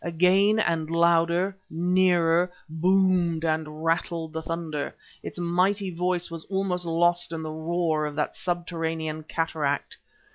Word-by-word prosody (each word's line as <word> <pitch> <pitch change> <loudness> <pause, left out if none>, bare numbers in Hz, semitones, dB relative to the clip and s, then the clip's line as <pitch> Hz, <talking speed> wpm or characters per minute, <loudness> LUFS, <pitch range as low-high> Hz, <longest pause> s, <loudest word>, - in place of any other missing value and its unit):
Again, 185 +5 +3
and 165 -6 0
louder, 170 +3 +2
nearer, 175 0 +2 0.2
boomed 175 0 +2
and 155 0 -2
rattled 165 0 -1
the 160 - -3
thunder; 160 -3 -4 0.3
its - - -7
mighty 185 +3 +1
voice 175 0 -1
was 165 -1 -5
almost 190 -2 -1
lost 175 +1 +2
in 160 -1 -4
the 155 - -4
roar 160 -1 -1
of 145 - -7
that 150 - -2
subterranean 165 -3 -3
cataract. 155 -3 -2
170 Hz, 130 wpm, -26 LUFS, 160-180 Hz, 0.3 s, Again